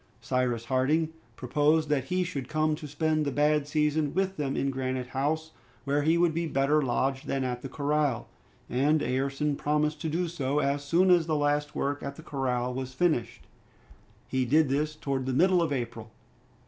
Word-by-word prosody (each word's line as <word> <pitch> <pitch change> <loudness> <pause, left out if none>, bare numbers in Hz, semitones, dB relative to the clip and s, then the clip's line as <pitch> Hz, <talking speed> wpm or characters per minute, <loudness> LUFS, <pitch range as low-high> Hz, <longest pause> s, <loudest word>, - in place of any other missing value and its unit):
Cyrus 125 -2 -1
Harding 140 +5 +1 0.3
proposed 150 +5 +2
that 140 -4 +1
he 180 +5 0
should 140 -8 -5
come 155 0 +1
to 150 0 -6
spend 155 +2 0
the 140 - -1
bad 150 +1 +2
season 150 -1 0
with 190 0 0
them 140 -4 -2
in 140 - 0
Granite 130 -1 -3
House, 155 +4 -1 0.3
where 145 +1 +1
he 160 +3 +3
would 170 -2 +3
be 170 +1 -1
better 145 +1 +2
lodged 135 +1 -1
than 135 -1 -1
at 125 -1 -3
the 135 - -6
corral, 145 -4 0 0.4
and 145 +5 +2
Ayrton 135 +3 0
promised 150 +1 0
to 160 - -2
do 175 +3 -1
so, 145 -4 -2
as 140 0 0
soon 175 +6 +3
as 170 -2 +4
the 155 - +1
last 145 0 0
work 145 +1 -1
at 140 0 -5
the 160 - -12
corral 125 -4 -1
was 130 0 -5
finished. 155 -6 0 0.8
He 130 -1 0
did 150 +4 +3
this 150 +3 0
towards 135 -3 -3
the 130 - 0
middle 185 +1 +4
of 165 -3 0
April. 120 -4 -4
145 Hz, 185 wpm, -28 LUFS, 130-155 Hz, 0.8 s, as